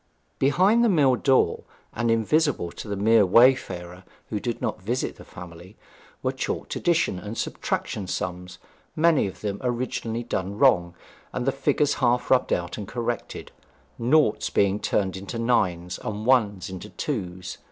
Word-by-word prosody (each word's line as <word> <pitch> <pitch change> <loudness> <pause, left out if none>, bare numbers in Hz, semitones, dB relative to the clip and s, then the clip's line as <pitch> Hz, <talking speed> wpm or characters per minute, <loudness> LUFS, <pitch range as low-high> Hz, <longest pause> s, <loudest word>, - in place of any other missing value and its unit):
Behind 185 - +4
the 235 - +4
mill 145 -9 +4
door, 130 +1 +2 0.3
and 120 +1 -1
invisible 115 - +1
to - - -9
the 100 - -3
mere 110 +2 +4
wayfarer 95 -5 +3 0.3
who 105 - -2
did 120 +1 -3
not 110 -6 -3
visit 120 +7 -2
the - - -12
family, 90 +2 -12 0.5
were - - +1
chalked - - -4
addition 165 - +1
and 105 +4 -7
subtraction 100 -3 -3
sums, 90 0 -4 0.4
many 160 -6 +3
of 95 - -9
them 100 -1 -3
originally 120 -2 -2
done 100 -3 -3
wrong, 90 -10 +3 0.4
and 125 - -3
the 135 - +3
figures 140 +2 +1
half 120 -1 +1
rubbed 130 -1 +3
out 90 +4 -2
and 100 - -6
corrected, 120 +1 -4 0.5
noughts 125 -1 +2
being 100 +1 +2
turned 95 -3 0
into 100 +5 -6
nines, 90 -7 0
and 105 0 -5
ones 105 -7 +2
into 95 +3 -8
twos. 90 - -5
110 Hz, 150 wpm, -25 LUFS, 95-130 Hz, 0.5 s, Behind